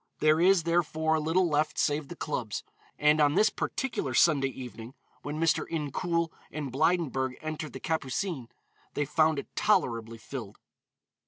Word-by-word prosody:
There 155 Hz, +1 st, +3 dB
is, 185 Hz, -1 st, +5 dB
therefore, 160 Hz, -1 st, +1 dB
little 165 Hz, +4 st, +2 dB
left 150 Hz, 0 st, 0 dB
save 145 Hz, 0 st, +1 dB
the 175 Hz, -, -8 dB
clubs, 125 Hz, -10 st, -3 dB, 0.3 s
and 150 Hz, +1 st, +4 dB
on 145 Hz, +1 st, +4 dB
this 210 Hz, +3 st, +4 dB
particular 145 Hz, -, -2 dB
Sunday 140 Hz, -3 st, +4 dB
evening, 125 Hz, -1 st, -8 dB, 0.3 s
when 150 Hz, +1 st, -5 dB
Mr. 165 Hz, -1 st, +2 dB
Incoul 165 Hz, +2 st, -1 dB, 0.2 s
and 145 Hz, -4 st, -4 dB
Blydenburg 135 Hz, -3 st, +1 dB
entered 155 Hz, -1 st, -5 dB
the -, -, -6 dB
Capucines, 155 Hz, -2 st, -2 dB, 0.5 s
they 145 Hz, -, 0 dB
found 155 Hz, +1 st, +2 dB
it 140 Hz, -, -7 dB
tolerably 115 Hz, -, +1 dB
filled. 110 Hz, -2 st, -8 dB
155 Hz, 145 wpm, -29 LUFS, 135-165 Hz, 0.5 s, is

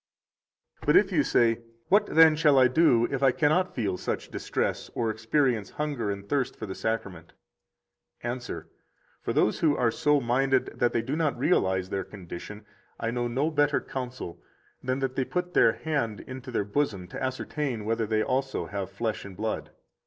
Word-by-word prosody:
75 -, -, -13 dB
But -, -, +7 dB
if -, -, -13 dB
you -, -, +4 dB
say: 115 Hz, -1 st, +2 dB, 0.3 s
What, 205 Hz, +2 st, +4 dB
then, 160 Hz, -1 st, +6 dB
shall 150 Hz, -3 st, +4 dB
I 130 Hz, -1 st, +7 dB
do 125 Hz, -3 st, +4 dB
if 135 Hz, -1 st, -2 dB
I 135 Hz, -1 st, +5 dB
cannot 155 Hz, +7 st, +1 dB
feel 100 Hz, -7 st, -1 dB
such -, -, -3 dB
distress -, -, -2 dB
or 115 Hz, -2 st, 0 dB
experience 115 Hz, -1 st, 0 dB
hunger 145 Hz, -8 st, -3 dB
and 100 Hz, 0 st, -5 dB
thirst 135 Hz, -1 st, 0 dB
for 110 Hz, -, -6 dB
the 95 Hz, -, -5 dB
Sacrament? 100 Hz, -7 st, -4 dB, 0.9 s
Answer: 120 Hz, +1 st, -4 dB, 0.5 s
For -, -, -2 dB
those -, -, +2 dB
who 150 Hz, -3 st, +3 dB
are 115 Hz, -2 st, +2 dB
so 150 Hz, +5 st, +2 dB
minded 130 Hz, +2 st, +1 dB
that 120 Hz, -, +3 dB
they 115 Hz, -, 0 dB
do 135 Hz, +5 st, -2 dB
not 155 Hz, -3 st, 0 dB
realize 95 Hz, -, +1 dB
their 95 Hz, -1 st, -1 dB
condition 100 Hz, +2 st, -9 dB, 0.3 s
I 115 Hz, -, -1 dB
know 120 Hz, 0 st, -1 dB
no 135 Hz, +7 st, 0 dB
better 145 Hz, -1 st, +2 dB
counsel 125 Hz, -9 st, -6 dB, 0.4 s
than 130 Hz, 0 st, 0 dB
that 130 Hz, -1 st, -1 dB
they 130 Hz, -, +1 dB
put 180 Hz, +5 st, -3 dB
their -, -, +5 dB
hand 140 Hz, -9 st, -2 dB
into 130 Hz, -1 st, -9 dB
their 115 Hz, -5 st, -1 dB
bosom 100 Hz, -5 st, -1 dB
to -, -, -7 dB
ascertain 130 Hz, -2 st, -3 dB
whether 115 Hz, 0 st, 0 dB
they 110 Hz, 0 st, +1 dB
also 130 Hz, +2 st, -1 dB
have 100 Hz, -2 st, -4 dB
flesh 110 Hz, -2 st, -3 dB
and 95 Hz, -2 st, -10 dB
blood. 110 Hz, +1 st, -3 dB
125 Hz, 180 wpm, -27 LUFS, 110-145 Hz, 0.9 s, But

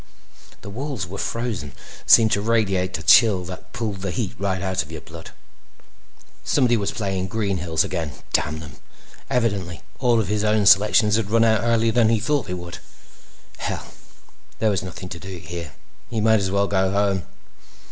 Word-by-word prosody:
The 100 Hz, -, -9 dB
walls 130 Hz, -, -4 dB
were 95 Hz, +2 st, -8 dB
frozen 115 Hz, -, -3 dB
and -, -, -16 dB
seemed 110 Hz, -2 st, +7 dB
to 100 Hz, -, +1 dB
radiate 100 Hz, -5 st, 0 dB
a 80 Hz, -, -9 dB
chill 95 Hz, +1 st, +5 dB
that 90 Hz, +1 st, -9 dB
pulled 105 Hz, -5 st, -4 dB
the 95 Hz, -, -3 dB
heat 100 Hz, +1 st, -3 dB
right 95 Hz, -1 st, -1 dB
out 95 Hz, 0 st, -1 dB
of 75 Hz, -, -9 dB
your 80 Hz, -, -6 dB
blood. 80 Hz, +1 st, -11 dB, 1.1 s
Somebody 125 Hz, -4 st, +2 dB
was 105 Hz, 0 st, -1 dB
playing 95 Hz, -6 st, -2 dB
Green 100 Hz, -1 st, -1 dB
Hills 80 Hz, -2 st, 0 dB
again, 80 Hz, -5 st, -4 dB, 0.2 s
damn 80 Hz, +1 st, 0 dB
them. 75 Hz, -4 st, -11 dB, 0.5 s
Evidently 100 Hz, -9 st, -1 dB, 0.2 s
all 120 Hz, -3 st, +3 dB
of 110 Hz, -, -1 dB
his 105 Hz, +1 st, 0 dB
own 105 Hz, -1 st, +2 dB
selections 105 Hz, +2 st, +5 dB
had 110 Hz, -3 st, -2 dB
run 115 Hz, +1 st, +3 dB
out 110 Hz, -1 st, +3 dB
earlier 115 Hz, -1 st, +2 dB
than 115 Hz, -1 st, +3 dB
he'd 115 Hz, -2 st, +2 dB
thought 145 Hz, -4 st, 0 dB
they 90 Hz, -, -3 dB
would. 85 Hz, 0 st, -8 dB, 0.8 s
Hell! -, -, -5 dB, 0.6 s
There 110 Hz, -1 st, +1 dB
was 100 Hz, -1 st, 0 dB
nothing 90 Hz, 0 st, -8 dB
to 85 Hz, -, -7 dB
do 95 Hz, 0 st, -8 dB
here. 85 Hz, -2 st, -7 dB, 0.4 s
He 115 Hz, -2 st, -2 dB
might 110 Hz, 0 st, +4 dB
as 95 Hz, -1 st, -1 dB
well 100 Hz, +1 st, +1 dB
go 95 Hz, -1 st, +1 dB
home. 100 Hz, -1 st, +1 dB
100 Hz, 185 wpm, -22 LUFS, 90-110 Hz, 1.1 s, seemed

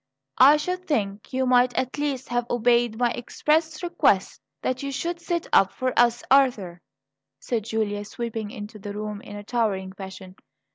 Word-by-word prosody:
"I 280 Hz, +4 st, +8 dB
should 365 Hz, +4 st, -4 dB
think 205 Hz, -, -2 dB
you 260 Hz, 0 st, 0 dB
might 250 Hz, 0 st, +3 dB
at 260 Hz, +2 st, -2 dB
least 280 Hz, -3 st, -2 dB
have 240 Hz, 0 st, -1 dB
obeyed 240 Hz, -1 st, +2 dB
my 240 Hz, 0 st, +2 dB
express 310 Hz, +7 st, -1 dB
request 345 Hz, -, +1 dB, 0.2 s
that 255 Hz, 0 st, -1 dB
you 280 Hz, 0 st, -3 dB
should 340 Hz, +5 st, -3 dB
sit 340 Hz, -1 st, -2 dB
up 190 Hz, -, +5 dB
for 255 Hz, -1 st, -2 dB
us, 240 Hz, 0 st, +3 dB
Arthur," 220 Hz, -11 st, +3 dB, 0.6 s
said 225 Hz, -, -2 dB
Julia, 215 Hz, -2 st, -2 dB
sweeping 225 Hz, 0 st, -5 dB
into 215 Hz, -1 st, -9 dB
the 205 Hz, 0 st, -6 dB
room 210 Hz, -1 st, -5 dB
in 205 Hz, -, -10 dB
a 205 Hz, -, -7 dB
towering 205 Hz, -5 st, -1 dB
passion. 190 Hz, -1 st, -10 dB
240 Hz, 165 wpm, -25 LUFS, 205-265 Hz, 0.6 s, I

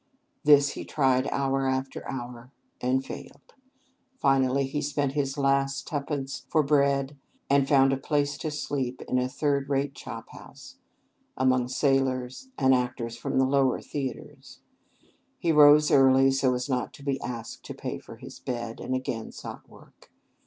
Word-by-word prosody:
This 145 Hz, -2 st, +6 dB
he -, -, -6 dB
tried 130 Hz, -2 st, +1 dB
hour 135 Hz, -1 st, 0 dB
after 130 Hz, 0 st, -3 dB
hour, 125 Hz, -1 st, -7 dB, 0.3 s
and 130 Hz, +2 st, 0 dB
failed. 140 Hz, 0 st, -10 dB, 0.7 s
Finally 135 Hz, 0 st, +2 dB
he 145 Hz, +2 st, -3 dB
spent 145 Hz, -1 st, -1 dB
his 140 Hz, -1 st, -2 dB
last 135 Hz, 0 st, +1 dB
twopence 140 Hz, -3 st, -4 dB
for 155 Hz, -2 st, +3 dB
bread, 140 Hz, -1 st, +1 dB, 0.3 s
and 140 Hz, -1 st, +4 dB
found 135 Hz, -1 st, +4 dB
a -, -, 0 dB
place 145 Hz, +1 st, 0 dB
to 155 Hz, -, -3 dB
sleep 135 Hz, -4 st, -3 dB
in 125 Hz, -, +1 dB
a 125 Hz, 0 st, -1 dB
third 140 Hz, 0 st, -1 dB
rate 140 Hz, 0 st, 0 dB
chop -, -, -8 dB
house, -, -, -13 dB, 0.6 s
among 130 Hz, -1 st, +2 dB
sailors, 130 Hz, -, 0 dB
and 130 Hz, -2 st, +4 dB
actors 125 Hz, -2 st, -1 dB
from 120 Hz, -, -3 dB
the 130 Hz, -, +4 dB
lower 135 Hz, -1 st, +2 dB
theatres. 135 Hz, -4 st, -7 dB, 0.8 s
He 170 Hz, -, 0 dB
rose 150 Hz, 0 st, +7 dB
early, 135 Hz, 0 st, +5 dB
so 135 Hz, -1 st, +2 dB
as 125 Hz, 0 st, -3 dB
not 125 Hz, -3 st, -2 dB
to 140 Hz, -, -13 dB
be 140 Hz, -1 st, -2 dB
asked 120 Hz, -1 st, -6 dB
to -, -, -7 dB
pay -, -, -5 dB
for -, -, -12 dB
his -, -, -11 dB
bed, 120 Hz, -2 st, -5 dB
and 130 Hz, -, -3 dB
again 120 Hz, -3 st, -4 dB
sought -, -, -10 dB
work. -, -, -19 dB
135 Hz, 160 wpm, -27 LUFS, 130-140 Hz, 0.8 s, rose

